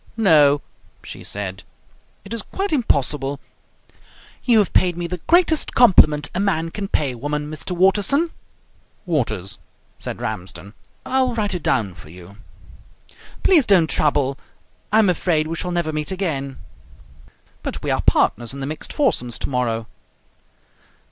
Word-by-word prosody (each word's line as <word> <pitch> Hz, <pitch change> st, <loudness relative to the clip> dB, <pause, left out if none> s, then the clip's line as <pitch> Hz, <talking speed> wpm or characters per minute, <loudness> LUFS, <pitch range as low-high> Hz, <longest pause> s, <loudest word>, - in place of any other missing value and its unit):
"No," 150 Hz, -9 st, +4 dB, 0.4 s
she -, -, -9 dB
said, 95 Hz, -2 st, -5 dB, 0.6 s
"it 200 Hz, -, -7 dB
is 230 Hz, -, -3 dB
quite 390 Hz, -, -4 dB
impossible. 145 Hz, -, 0 dB, 1.0 s
You 240 Hz, -3 st, +4 dB
have 205 Hz, -3 st, +2 dB
paid 175 Hz, -2 st, +2 dB
me 175 Hz, -, -3 dB
the 180 Hz, +1 st, -5 dB
greatest 340 Hz, -3 st, +3 dB
compliment 155 Hz, -11 st, +5 dB
a 180 Hz, -, -2 dB
man 165 Hz, -5 st, 0 dB
can 200 Hz, +1 st, -4 dB
pay 145 Hz, -8 st, 0 dB
a 125 Hz, -, -9 dB
woman, 150 Hz, +2 st, -3 dB
Mr. 155 Hz, +4 st, -4 dB
Waterson 205 Hz, -, +3 dB, 0.4 s
" -, -, -38 dB
"Waters," 110 Hz, -, -2 dB, 0.4 s
said -, -, -5 dB
Ramsden. 95 Hz, +2 st, -5 dB, 0.3 s
"I'll 260 Hz, -2 st, +1 dB
write 205 Hz, -3 st, -1 dB
it 180 Hz, -, -3 dB
down 110 Hz, -11 st, 0 dB
for 80 Hz, -4 st, -14 dB
you." 90 Hz, +4 st, -13 dB, 1.1 s
"Please 345 Hz, -7 st, +5 dB
don't 180 Hz, -5 st, +5 dB
trouble. 140 Hz, -2 st, +1 dB, 0.5 s
I 215 Hz, -, +4 dB
am 220 Hz, -2 st, +5 dB
afraid 170 Hz, -3 st, +1 dB
we 165 Hz, +1 st, -4 dB
shall 180 Hz, -, -3 dB
never 170 Hz, -3 st, -1 dB
meet 150 Hz, +3 st, -2 dB
again 145 Hz, -8 st, -3 dB, 0.5 s
" -, -, -28 dB
"But -, -, -5 dB
we -, -, -1 dB
are -, -, +1 dB
partners 120 Hz, +2 st, +1 dB
in -, -, -7 dB
the 135 Hz, -, -3 dB
mixed 155 Hz, +3 st, -5 dB
foursomes 195 Hz, -, +1 dB
tomorrow." 120 Hz, -3 st, -2 dB
155 Hz, 150 wpm, -21 LUFS, 135-200 Hz, 1.1 s, compliment